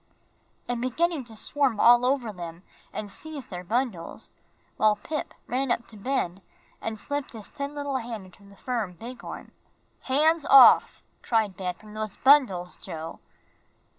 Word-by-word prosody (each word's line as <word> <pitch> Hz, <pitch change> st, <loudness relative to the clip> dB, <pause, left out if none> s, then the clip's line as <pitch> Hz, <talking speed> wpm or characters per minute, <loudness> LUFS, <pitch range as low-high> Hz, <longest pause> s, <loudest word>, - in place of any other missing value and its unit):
and 245 Hz, -1 st, -2 dB
beginning 305 Hz, +4 st, 0 dB
to 230 Hz, -2 st, -10 dB
swarm 260 Hz, -1 st, 0 dB
all 240 Hz, +1 st, +7 dB
over 255 Hz, -5 st, 0 dB
them 170 Hz, -1 st, -8 dB, 0.3 s
and 205 Hz, -2 st, -6 dB
seize 300 Hz, +1 st, -6 dB
their 180 Hz, -3 st, -7 dB
bundles, 220 Hz, -3 st, -3 dB, 0.5 s
while 215 Hz, -1 st, +4 dB
Pip 300 Hz, +9 st, -5 dB
ran 265 Hz, +2 st, -1 dB
up 235 Hz, -, 0 dB
to 220 Hz, -, -12 dB
Ben 200 Hz, -5 st, -2 dB, 0.4 s
and 225 Hz, -1 st, -3 dB
slipped 285 Hz, +4 st, -4 dB
his 220 Hz, -3 st, -9 dB
thin 280 Hz, +1 st, -6 dB
little 285 Hz, -2 st, -2 dB
hand 230 Hz, -5 st, -6 dB
into 185 Hz, +2 st, -18 dB
the 200 Hz, 0 st, -16 dB
firm, 225 Hz, -3 st, -3 dB
big 235 Hz, +8 st, -9 dB
one. -, -, -8 dB, 0.5 s
"Hands 310 Hz, +4 st, +3 dB
off," 275 Hz, -2 st, +7 dB, 0.2 s
cried 220 Hz, -5 st, +1 dB
Ben, 180 Hz, -3 st, -3 dB
"from 210 Hz, +2 st, -15 dB
those 215 Hz, -1 st, -4 dB
bundles, 245 Hz, -11 st, +4 dB
Joe!" 165 Hz, -3 st, -7 dB
230 Hz, 155 wpm, -26 LUFS, 200-270 Hz, 0.5 s, all